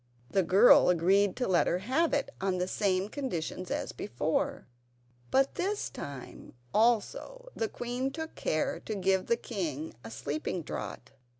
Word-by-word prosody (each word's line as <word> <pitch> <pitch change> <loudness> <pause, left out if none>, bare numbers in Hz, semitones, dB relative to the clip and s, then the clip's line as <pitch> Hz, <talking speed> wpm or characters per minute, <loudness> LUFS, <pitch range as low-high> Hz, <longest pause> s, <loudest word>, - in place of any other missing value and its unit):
The 195 - +3
girl 190 +5 +7
agreed 185 +3 +3
to 250 - -1
let 180 -2 +3
her 175 - +2
have 260 - +1
it - - 0
on 190 -1 0
the 180 0 0
same 190 -1 +1
conditions 185 - -4
as - - -2
before; 120 +9 -2 0.6
but 270 +1 +3
this 405 +3 -2
time, 140 -3 -8 0.2
also, 240 - +1
the 225 - -1
queen 245 +2 -2
took 320 +3 -6
care 155 - -1
to 215 - -5
give 190 -1 +1
the 235 - +3
king 160 - -4
a - - -7
sleeping 155 +4 -3
draught. 125 -3 -6
195 Hz, 155 wpm, -30 LUFS, 175-245 Hz, 0.6 s, girl